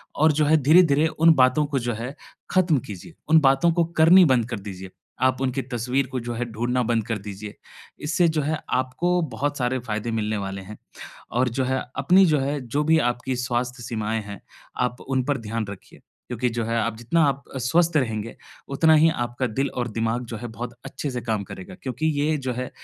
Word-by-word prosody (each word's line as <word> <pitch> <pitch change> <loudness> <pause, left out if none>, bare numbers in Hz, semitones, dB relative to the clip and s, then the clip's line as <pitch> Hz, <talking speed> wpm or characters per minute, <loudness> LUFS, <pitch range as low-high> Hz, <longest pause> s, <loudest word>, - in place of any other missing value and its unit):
और 155 +1 +4
जो 150 +1 +2
है, 155 +2 +5
धीरे-धीरे 155 0 +5
उन 165 +1 +4
बातों 130 +3 +4
को 135 - +1
जो 120 0 -2
है, 120 +5 -6 0.4
खत्म 180 -5 +3
कीजिए, 100 - -9 0.2
उन 160 0 +7
बातों 135 +4 +4
को - - +5 0.2
करनी 180 +4 +8
बंद 130 -6 +3
कर 115 - -4
दीजिए, 95 -2 -8 0.3
आप 130 0 +2
उनकी 135 0 0
तस्वीर 125 +3 0
को 130 0 -4
जो 120 0 -5
है, 120 +1 -2
ढूँढना 120 +3 0
बंद 115 -2 0
कर 115 - -1
दीजिए। 100 +1 -8 0.5
इससे 170 +3 +2
जो 155 -1 0
है, 155 +2 -1
आपको 175 +8 0
बहुत 145 +1 -2
सारे 125 +1 0
फ़ायदे 115 -1 -4
मिलने 110 -1 -1
वाले 95 -1 -5
हैं 105 +3 -10 0.6
और 125 +1 +2
जो - - +2
है, 130 +1 0 0.2
अपनी 190 +2 +5
जो 155 -3 +3
है, 140 +2 -1
जो 130 +4 -2
भी 160 +1 +4
आपकी 125 +1 -4
स्वास्थ्य 125 0 -2
सीमाएँ 110 -1 -2
हैं, 100 -1 -9 0.5
आप 125 - -7
उन 130 -2 0
पर 145 -1 0
ध्यान 115 -1 -2
रखिए, 100 - -12 0.3
क्योंकि 125 0 -1
जो 115 - 0
है, 115 +1 -1
आप 115 0 -2
जितना 155 +8 +2
आप 140 0 -1
अ, - - -3
स्वस्थ 160 +6 +2
रहेंगे, 115 -5 -1 0.3
उतना 160 +3 +4
ही - - +7 0.2
आपका 120 +2 -3
दिल 140 - 0
और 120 -1 -3
दिमाग 115 +2 -1
जो - - -5
है, 120 +1 -6
बहुत 120 0 -5
अच्छे 145 - -5
से 125 -1 -4
काम 105 -2 -1
करेगा 185 0 -9
क्योंकि 130 +4 -2
ये 155 +1 +1
जो - - 0
है 125 +1 -4
130 Hz, 215 wpm, -24 LUFS, 115-150 Hz, 0.6 s, करनी